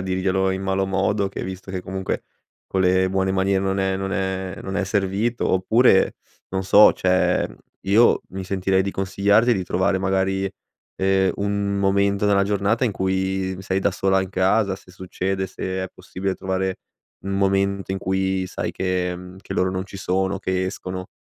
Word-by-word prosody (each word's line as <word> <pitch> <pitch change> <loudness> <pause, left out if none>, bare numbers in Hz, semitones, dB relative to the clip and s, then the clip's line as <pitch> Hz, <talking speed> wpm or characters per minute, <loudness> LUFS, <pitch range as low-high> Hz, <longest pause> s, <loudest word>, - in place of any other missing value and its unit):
a - - -3
dirglielo 95 0 0
in 95 0 -3
malo 95 0 0
modo 95 +1 0
che - - -6
visto 95 +1 -7
che, 95 -1 -3
comunque, 95 +1 -4 0.4
con 95 - -1
le 95 0 +3
buone 95 0 0
maniere 95 0 +1
non 95 0 0
è 95 0 +1
non 95 0 -3
è 95 0 -2
non 95 - -5
è 100 - +1
servito 100 +4 0
oppure, 95 +2 +4 0.3
non 95 0 -2
so, 105 +2 +7
cioè, 95 0 +1 0.3
io 110 +5 +4
mi 95 +1 -5
sentirei 95 0 +1
di 100 - -2
consigliarti 100 +5 +2
di 95 - -1
trovare, 95 +2 +1
magari, 95 0 0 0.5
ehm, 95 0 +2
un 100 0 -1
momento 100 +1 +2
della 100 -1 +4
giornata 105 +4 +1
in 120 - +1
cui 95 -1 -1
sei 95 0 -1
da 95 0 +1
sola 95 0 +2
in 95 - -5
casa, 95 +1 +2
se 95 - -15
succede 95 +1 -3
e - - -4
se 95 - -10 0.2
è - - -6
possibile, 95 +1 -4
trovare 95 0 -2 0.4
un 95 - -5
momento 100 0 +1
in 95 - -1
cui 95 0 -1
sai - - -4
che, 90 -1 -1
mhmm, 90 +1 -11
che - - -7
loro 95 0 +1
non 95 0 -2
ci 100 - -10
sono 95 +1 0
o - - -4
che 95 -1 -1
escono. 95 0 -5
95 Hz, 185 wpm, -22 LUFS, 95-100 Hz, 0.5 s, so